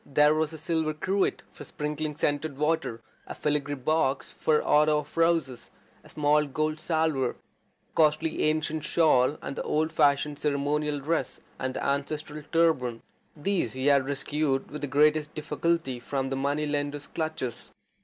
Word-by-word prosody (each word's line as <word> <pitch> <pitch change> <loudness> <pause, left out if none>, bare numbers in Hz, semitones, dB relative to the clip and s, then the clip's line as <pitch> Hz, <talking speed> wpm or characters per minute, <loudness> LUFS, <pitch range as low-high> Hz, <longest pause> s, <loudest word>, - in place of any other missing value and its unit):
There 150 +2 +4
was 155 0 0
a 160 - -8
silver 160 0 -1
cruet 190 +5 0
for - - -11
sprinkling 150 -1 -4
scented 145 -1 -1
water, 150 -6 0 0.3
a - - -6
filigree 145 -1 -1
box 135 0 0
for 155 -1 +1
otto 150 0 +4
of 150 0 -6
roses, 165 -7 +1 0.3
a - - -16
small 150 0 +2
gold 155 +3 -1
salver, 155 -5 +1
a - - -26 0.6
costly 155 0 +2
ancient 155 0 0
shawl, 150 -4 +3
and 140 - -4
the - - -3
old 155 +1 0
fashioned 145 0 +2
ceremonial 145 +1 0
dress 160 +4 -1 0.2
and 130 0 -2
ancestral 150 +2 -2
turban. 155 -9 +2 0.3
These 170 - -1
he 130 +1 -3
had 140 -2 +4
rescued 140 -1 -1
with 150 - -6
the 145 - -2
greatest 150 +2 +2
difficulty 155 -4 -1
from 135 +1 -3
the - - 0
money 140 +3 0
lenders' 145 0 -2
clutches. 155 -7 -4
150 Hz, 155 wpm, -27 LUFS, 140-155 Hz, 0.6 s, There